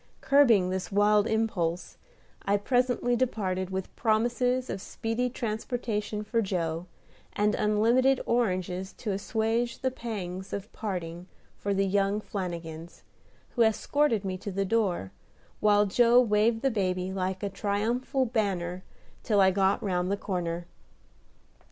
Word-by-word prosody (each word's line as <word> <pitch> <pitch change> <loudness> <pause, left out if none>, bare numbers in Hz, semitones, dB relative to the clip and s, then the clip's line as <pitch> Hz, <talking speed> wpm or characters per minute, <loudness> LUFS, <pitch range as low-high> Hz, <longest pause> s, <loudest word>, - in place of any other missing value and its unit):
Curbing 230 -10 +4
this 190 +1 -3
wild 205 +1 +4
impulse 185 -7 -1 0.5
I 200 +1 +1
presently 245 +2 +1
departed 190 -7 -1
with 190 -1 -5
promises 240 +3 +1
of 195 - -4
speedy 225 +4 -2
transportation 220 -2 -3
for 230 +2 0
Joe, 170 -4 -2 0.5
and 210 +1 +1
unlimited 235 +6 +3
oranges 190 -5 -1
to 215 - -4
assuage 225 +4 -1
the 260 - -1
pangs 195 -6 -6
of 200 +3 -5
parting 180 -4 -5 0.3
for 200 - -3
the 195 0 +2
young 200 +1 +1
Flanagins, 170 -5 -6 0.5
who 240 - -2
escorted 225 0 +2
me 185 -1 -3
to 200 - -5
the 195 +1 -1
door, 190 - 0 0.5
while 210 -1 +4
Joe 235 +4 +5
waved 225 0 +2
the 270 - +3
baby 185 -3 -1
like 185 0 -2
a 200 - 0
triumphal 225 +7 0
banner 190 -6 -1 0.4
till 210 -3 +1
I 190 -1 +6
got 190 +1 +1
round 180 -2 0
the 200 - 0
corner. 175 -3 -3
205 Hz, 135 wpm, -28 LUFS, 185-230 Hz, 0.5 s, I